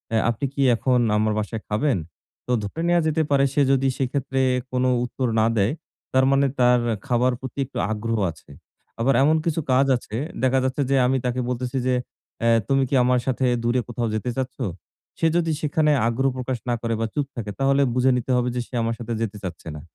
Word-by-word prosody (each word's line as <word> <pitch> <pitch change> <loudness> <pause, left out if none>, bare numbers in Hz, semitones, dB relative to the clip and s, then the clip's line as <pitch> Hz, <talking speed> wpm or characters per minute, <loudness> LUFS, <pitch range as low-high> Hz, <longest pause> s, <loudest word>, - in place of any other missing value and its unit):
"এ - - +4
আপনি 120 +4 -2
কী 140 - -2
এখন 125 +2 +1 0.2
আমার 110 0 +1
বাসায় 110 +1 -4
খাবেন?" 115 +3 +1 0.5
তো - - -2
ধরে 130 +11 -5
নেয়া 175 0 +3
যেতে 155 0 +1
পারে 140 -1 +4
সে 145 - +2
যদি 135 0 +2
সেক্ষেত্রে 135 0 -1 0.3
কোন 125 0 0 0.2
উত্তর 125 +1 -2
না 110 - +4
দেয়, 100 +5 +2 0.4
তার 130 0 +4
মানে 140 0 +3
তার 125 0 +5 0.3
খাবার 125 0 +2
প্রতি 130 +1 -7
একটু 135 - -10
আগ্রহ 115 +1 -2
আছে। 80 - -18 0.5
আবার 130 +4 +3
এমন 155 +3 +4
কিছু 165 -1 0
কাজ 135 +2 +4
আছে, 110 -2 -9 0.3
দেখা 130 +1 +3
যাচ্ছে 130 +2 -1
যে 140 - +3
আমি 130 +1 +2
তাকে 125 0 -1
বলতেছি 125 +1 -3
যে, 125 - +2 0.5
"অ্যা 115 - +3 0.2
তুমি 135 0 +2
কী 140 - +1
আমার 125 0 +3
সাথে 130 0 0 0.2
দূরে 120 +2 +2
কোথাও 120 0 -2
যেতে 110 +3 -2
চাচ্ছ?" 130 -1 -3 0.6
সে 165 - +3
যদি 165 -1 +1
সেখানে 150 0 +2 0.2
আগ্রহ 130 +4 +1
প্রকাশ 130 0 -2
না - - +2
করে 115 -1 -1
বা, - - +1
চুপ 145 -2 -1
থাকে, 110 -4 -4
তাহলে 135 +1 +3
বুঝে 130 +1 +3
নিতে 125 +1 -3
হবে 125 0 +1
যে 125 - 0
সে - - -29
আমার 115 0 -1
সাথে 120 0 -4
যেতে 105 -2 -3
চাচ্ছে 85 -2 -7
না। 75 - -8
125 Hz, 210 wpm, -23 LUFS, 115-135 Hz, 0.6 s, তার